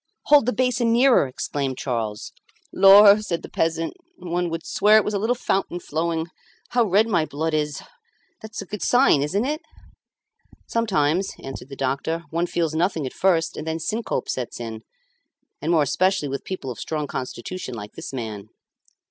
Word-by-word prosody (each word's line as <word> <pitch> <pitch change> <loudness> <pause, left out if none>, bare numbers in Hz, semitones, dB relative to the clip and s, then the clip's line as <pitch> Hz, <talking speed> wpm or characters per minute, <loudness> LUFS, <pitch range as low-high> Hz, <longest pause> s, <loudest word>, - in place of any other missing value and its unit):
"Hold 290 -5 +5
the - - +3
basin 245 -1 +1
nearer," 245 - +5
exclaimed 135 0 -3
Charles. 115 -5 -3 0.4
"Lor!" 200 +2 +8
said 170 -6 -3
the - - -8
peasant, 165 0 -1 0.2
"one 175 0 -2
would 165 0 -5
swear 210 +1 +4
it 215 - +3
was 210 - -2
a 200 - 0
little 225 +4 +1
fountain 195 -6 -1
flowing. 160 0 -2 0.4
How 240 -1 +2
red 205 +2 +3
my 175 -8 +2
blood 155 +2 -3
is! 150 -2 -1 0.6
That's 220 -1 -7
a - - -14
good 210 +2 -7
sign, 245 - +4
isn't 195 - 0
it?" 300 +3 -2 1.0
"Sometimes," 190 -5 0
answered 135 0 -8
the 135 - -8
doctor, 140 +5 -2
"one 170 +2 0
feels 165 -3 -1
nothing 165 -2 0
at 130 - -5
first, 175 -4 +1
and 155 - -6
then 160 0 -1
syncope 220 +8 -3
sets 125 -2 -4
in, 115 -2 -6 0.8
and 160 - -1
more 160 -3 +4
especially 185 +1 +1
with 140 0 -5
people 185 -9 -5
of 120 - -9
strong 155 -2 -3
constitution 130 +3 -6
like 105 -2 -8
this - - -8
man." 110 -5 -6
165 Hz, 175 wpm, -23 LUFS, 140-205 Hz, 1.0 s, Lor